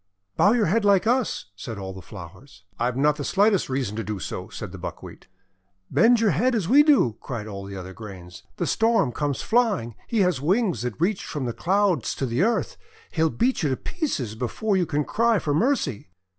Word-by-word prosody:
"Bow 205 - +4
your 235 -3 +2
head 215 +7 +1
like 200 -3 +4
us!" 235 - 0
said 110 +3 -7
all 95 -1 -6
the 95 - -9
flowers. 95 +4 -12 0.2
"I've 120 +1 0
not 150 +2 +3
the 145 - -4
slightest 200 +1 +2
reason 130 -6 -2
to 115 - -2
do 105 -1 -4
so," - - -6
said - - -7
the - - -9
Buckwheat. - - -9 0.6
"Bend 225 - +5
your 220 -3 +3
head 240 - +1
as 200 -7 -1
we 275 +8 +7
do!" 280 - +3
cried 115 -5 -5
all 100 -2 -7
the 100 0 -8
other 95 0 -8
grains. 95 -4 -10
'The - - -2
Storm 225 - +2
comes 145 +1 -2
flying. 220 - +1
He 225 -3 +1
has 180 -8 +1
wings 185 - +1
that 120 -3 -4
reach 185 +4 0
from 145 -5 -4
the 120 - -2
Clouds 185 - +1
to 135 - -2
the 120 +4 -1
earth. 235 - 0 0.3
He'll 160 -1 +2
beat 245 +9 0
you 150 - +1
to 130 - -1
pieces 205 - -3
before 130 - -1
you 180 -3 +1
can 150 -1 -1
cry 230 0 +2
for 150 -5 -1
mercy." 155 - 0
150 Hz, 210 wpm, -24 LUFS, -, 0.6 s, we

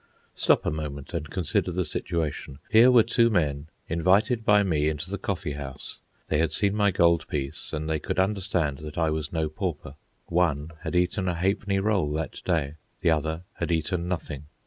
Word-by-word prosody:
Stop - - +2
a - - +1
moment, 75 -2 -5
and 75 -3 -3
consider 90 0 0
the 90 0 -1
situation. 75 -3 -3
Here 115 +3 +8
were 120 -3 +7
two 115 +1 +3
men, 75 -7 0 0.2
invited 100 +8 +2
by 105 -1 +5
me 75 -5 +1
into 80 +4 -5
the 100 - -3
coffee 95 -5 -3
house. 70 -2 -7 0.3
They 75 - +1
had 80 -1 +2
seen 100 +4 +1
my 105 -1 +3
gold 85 -3 +3
piece, 70 0 -4
and 75 0 -3
they 80 -1 0
could - - -4
understand 95 -7 0
that 75 -1 -8
I 80 -2 +2
was 80 -1 -3
no 80 -2 0
pauper. 80 -3 -4 0.3
One 80 -3 0
had - - -4
eaten 90 +2 +1
a 90 - 0
ha'penny 100 +3 0
roll 95 -7 +1
that 80 +1 -4
day, 80 -4 -1 0.2
the 85 - +3
other 80 +2 -1
had - - -2
eaten 85 +2 0
nothing. 80 -5 -4
85 Hz, 190 wpm, -26 LUFS, 75-95 Hz, 0.3 s, Here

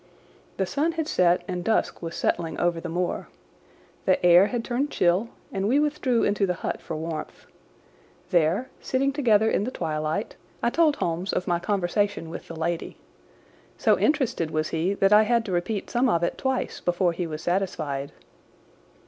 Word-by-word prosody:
The 190 - +1
sun 300 - 0
had 320 -2 -2
set 180 - +3
and 180 -2 -3
dusk 220 +4 0
was 170 -1 -5
settling 165 -2 -1
over 175 -1 +1
the 175 - -5
moor. 175 +2 -2 0.8
The 185 -1 +2
air 175 +3 +7
had 235 -1 -3
turned 265 +4 -1
chill 185 +3 +2 0.2
and 195 +1 -1
we 265 +6 +3
withdrew 290 -5 +1
into 205 -1 +1
the 180 - 0
hut - - -2
for 160 - -5
warmth. 160 0 -6 0.9
There, 175 +8 +2
sitting 275 +1 0
together 220 -7 +3
in 205 - +1
the 235 - -2
twilight, 155 -2 -3 0.3
I 235 - +2
told 315 -1 +3
Holmes 175 - -2
of 180 - -1
my 175 -1 +1
conversation 200 -2 -1
with - - -8
the 165 - -8
lady. 170 +1 -3 0.8
So - - +4
interested 255 - +1
was 155 0 -1
he 170 +5 0
that 195 +1 +3
I 210 - +8
had 230 +1 +2
to 200 - -4
repeat 185 +4 -2
some 250 +1 +2
of 170 -5 +1
it 170 - 0
twice 265 -1 -2
before 175 0 +1
he 170 0 -3
was 155 0 -6
satisfied. 155 -7 -2
185 Hz, 175 wpm, -25 LUFS, 170-235 Hz, 0.9 s, I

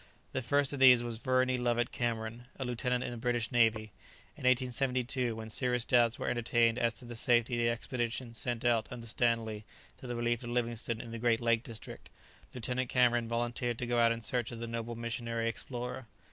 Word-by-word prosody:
The 130 - -2
first 140 +3 +1
of 140 - -4
these 125 -2 +8
was 115 -2 -4
Verney 130 0 +2
Lovett 120 -1 +1
Cameron, 115 0 -3
a 135 - -3
lieutenant 125 +1 -1
in - - -4
the 120 - -6
British 120 0 -1
navy. 110 -3 +2 0.4
In - - -8
1872, 125 -1 +1
when 110 0 -7
serious 125 0 0
doubts 120 -2 +3
were - - -4
entertained 120 0 +2
as 115 -2 +1
to 110 - -11
the 120 0 -8
safety 120 +1 +2
of 120 - +1
the - - +4
expedition 120 0 -3
sent 120 0 -3
out 115 -2 +3
under 120 -2 -7
Stanley 115 -2 0 0.4
to 130 - -9
the 120 - -3
relief 120 0 0
of 120 - -6
Livingstone 120 -1 -2
in 115 - -9
the 115 - -5
great 115 -1 +2
lake 115 -1 +2
district, 115 -2 -8 0.4
Lieutenant 125 +1 -2
Cameron 120 -2 +3
volunteered 120 0 -1
to 125 - -3
go 120 0 +1
out 115 0 +5
in 115 0 -2
search 120 +2 -1
of 115 - -7
the 115 - -4
noble 115 0 -4
missionary 115 0 -2
explorer. 120 +2 -5
120 Hz, 200 wpm, -32 LUFS, 115-125 Hz, 0.4 s, these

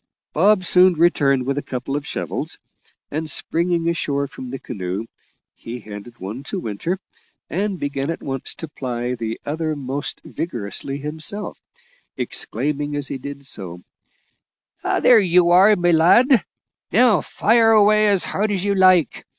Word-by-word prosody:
Bob 185 +3 +3
soon 180 +1 +5
returned 140 -6 +2
with 140 +2 -1
a - - -5
couple 130 +1 -5
of 145 0 -4
shovels, - - -4 0.5
and, 155 +2 -3
springing 170 +3 0
ashore 140 -4 -1
from 130 -2 -9
the 135 - -5
canoe, 95 -2 -5 0.5
he 120 +2 -8
handed 105 +2 -10
one 105 +6 -7
to 140 - -5
Winter, 115 - -3 0.5
and 195 +2 -1
began 140 -1 -3
at 165 - -4
once 135 -1 -2
to 165 - -7
ply 125 -4 -4
the 115 -2 -4
other 155 +1 -2
most 140 0 -3
vigorously 130 -2 -5
himself, 155 +8 -4 0.6
exclaiming 145 0 -1
as 145 -2 -2
he 135 - -4
did 140 +1 -8
so: 90 -9 -5 1.0
"There 240 -3 +4
you 180 -2 +3
are, 195 +4 +6
my 175 -2 +2
lad: 195 - +5 0.5
now 225 0 +4
fire 225 +1 +2
away 215 -1 +5
as 200 -3 +3
hard 210 +1 -1
as 190 -3 -1
you 200 - +2
like. 185 - +3
155 Hz, 150 wpm, -21 LUFS, 135-185 Hz, 1.0 s, are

